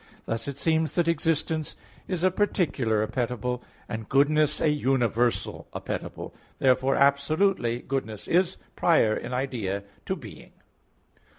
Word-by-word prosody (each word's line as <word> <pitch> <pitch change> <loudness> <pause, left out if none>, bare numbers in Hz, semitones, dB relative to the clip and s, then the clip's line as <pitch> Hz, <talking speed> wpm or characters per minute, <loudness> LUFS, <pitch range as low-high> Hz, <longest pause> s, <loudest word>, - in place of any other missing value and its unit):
Thus 115 +2 -3
it 140 -1 -4
seems 160 +1 +1
that 175 -2 +2
existence 160 -1 0 0.3
is 180 -3 -2
a 185 - +4
particular 140 - +1
appetible, 125 +1 -2 0.3
and 110 -1 -6
goodness 150 +2 +3
a 155 - +3
universal 125 -5 +1
appetible. - - -5 0.2
Therefore, 130 +1 +3
absolutely, 140 -2 +2
goodness 110 -6 -4
is 180 +1 +2 0.2
prior 115 -11 +4
in 120 - -5
idea 120 -7 -2 0.2
to - - 0
being. - - -12
135 Hz, 120 wpm, -27 LUFS, 120-160 Hz, 0.3 s, a